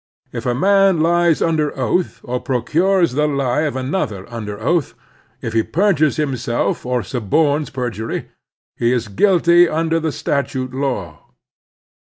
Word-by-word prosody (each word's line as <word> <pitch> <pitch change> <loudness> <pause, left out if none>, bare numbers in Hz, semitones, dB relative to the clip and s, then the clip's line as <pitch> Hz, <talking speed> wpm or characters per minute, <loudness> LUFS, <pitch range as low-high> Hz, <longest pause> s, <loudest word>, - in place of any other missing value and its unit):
If 120 0 -4
a 120 - +1
man 195 +3 +3
lies 170 0 +3
under 155 -3 0
oath 165 +8 -1
or 125 0 -3
proctires 170 +8 +1
the 150 +2 +1
lie 140 -2 0
of 135 - -8
another 130 - -3
under 105 -3 -5
oath, 160 +6 0 0.5
if 115 - -4
he 115 - +3
perjxires 160 - +1
himself 125 -5 -1
or 125 -2 0
suborns 140 - 0
per 125 -2 -3
jury, 110 +1 -5 0.5
he 120 0 +1
is 120 -3 -2
guilty 175 - +4
under 165 +1 0
the 160 -1 -2
statute 135 -3 -2
law. 120 - -4
140 Hz, 145 wpm, -19 LUFS, 120-165 Hz, 0.5 s, guilty